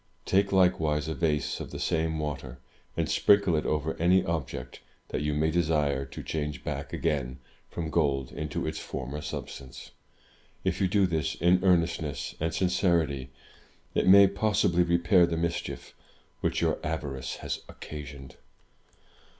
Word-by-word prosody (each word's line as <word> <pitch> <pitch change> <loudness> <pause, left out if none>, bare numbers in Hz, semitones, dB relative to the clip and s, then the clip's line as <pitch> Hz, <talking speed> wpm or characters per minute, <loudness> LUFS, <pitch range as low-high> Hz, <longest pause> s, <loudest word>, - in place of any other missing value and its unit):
Take 100 +1 +2
likewise 80 -5 +2
a 80 - -1
vase 75 -1 0
of - - -6
the - - -7
same 80 0 0
water, 70 -4 -4 0.4
and - - +1
sprinkle 100 -4 +4
it 75 - 0
over 75 +1 -1
any 90 +2 +4
object 65 -6 -4 0.3
that - - -2
you 75 0 -1
may 80 +2 +2
desire 75 -5 +1
to 65 - -9
change 75 -3 -3
back 70 -1 -4
again 65 -4 -1 0.3
from 80 -2 -4
gold 70 -5 +1
into 75 0 -3
its - - -3
former 70 +3 -5
substance. 70 -4 -7 0.7
If - - -1
you 95 - +4
do 100 +1 +3
this 80 -3 -1
in 90 +2 +3
earnestness 85 -7 +1
and 80 +1 0
sincerity, 85 -7 +1 0.6
it - - +1
may 100 +1 +9
possibly 100 -3 +2
repair 85 +1 +4
the 85 -1 -2
mischief 85 +1 -3 0.5
which - - 0
your - - +1
avarice 70 -5 -3
has - - -2
occasioned." 70 -3 -9
80 Hz, 145 wpm, -28 LUFS, 70-85 Hz, 0.7 s, may